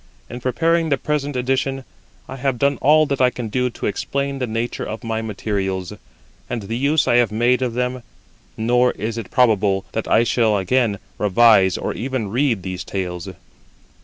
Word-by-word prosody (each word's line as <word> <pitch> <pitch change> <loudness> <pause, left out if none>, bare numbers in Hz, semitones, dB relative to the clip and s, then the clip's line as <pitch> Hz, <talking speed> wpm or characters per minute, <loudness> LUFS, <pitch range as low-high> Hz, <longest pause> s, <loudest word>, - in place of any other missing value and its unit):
In 120 - -6
preparing 165 +6 +1
the 140 - +2
present 145 0 -2
edition, 130 +1 -1 0.4
I 130 - -7
have 135 -1 -1
done 140 +2 +1
all 155 +2 +5
that 140 -2 -2
I 125 - +5
can 120 -3 -6
do 125 +3 0
to 115 - -7
explain 140 +6 -2
the 125 - -1
nature 115 +2 -3
of 110 +3 -6
my 115 -1 -2
materials, 95 -4 -3 0.6
and 115 -3 -3
the 115 +4 -4
use 145 +5 +2
I 120 - +4
have 120 -4 +3
made 120 +4 +2
of 120 -3 -1
them; 125 0 -2 0.6
nor 120 +2 +2
is 115 +2 -4
it 105 - -8
probable 105 -5 +2
that 110 - -3
I 115 - +4
shall 115 -3 +2
again 105 +2 +1 0.2
revise 105 -2 +4
or - - -3
even 125 -3 -3
read 120 -3 0
these 95 -1 -5
tales. 90 -1 -4
120 Hz, 180 wpm, -20 LUFS, 105-130 Hz, 0.6 s, all